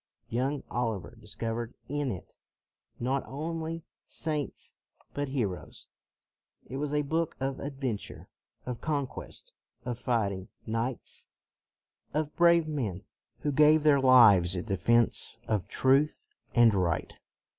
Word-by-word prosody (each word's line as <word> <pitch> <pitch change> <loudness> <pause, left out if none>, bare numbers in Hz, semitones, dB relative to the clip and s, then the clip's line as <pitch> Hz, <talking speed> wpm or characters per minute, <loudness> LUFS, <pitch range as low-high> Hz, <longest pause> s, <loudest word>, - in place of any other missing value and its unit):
Young 135 +5 -1
Oliver 115 -2 -2
dis 105 -2 -11
covered 115 +1 -3
in 145 -1 -1
it 90 - -8 0.6
not 130 +3 0
only 160 +3 -4 0.2
saints 150 -3 -3 0.4
but 145 -1 -2
heroes; 110 -10 -3 0.8
it 135 - -6
was 145 0 -2
a 150 0 +1
book 160 +3 -1
of 135 0 -2
adventure, 135 -6 -4 0.4
of 125 -2 -5
conquest, 145 -4 -4 0.3
of 120 -1 -3
fighting 100 -7 -1 0.2
knights, 115 +3 -3 0.9
of 155 -1 -1
brave 170 -2 +5
men 115 - -3 0.4
who 145 - 0
gave 150 +2 +5
their 145 -2 +5
lives 105 -9 +7
in 90 - -3
defense 115 +3 +2
of 105 -4 0
truth 140 - +2 0.3
and 120 -2 +6
right. 90 -5 -1
130 Hz, 120 wpm, -29 LUFS, 115-150 Hz, 0.9 s, lives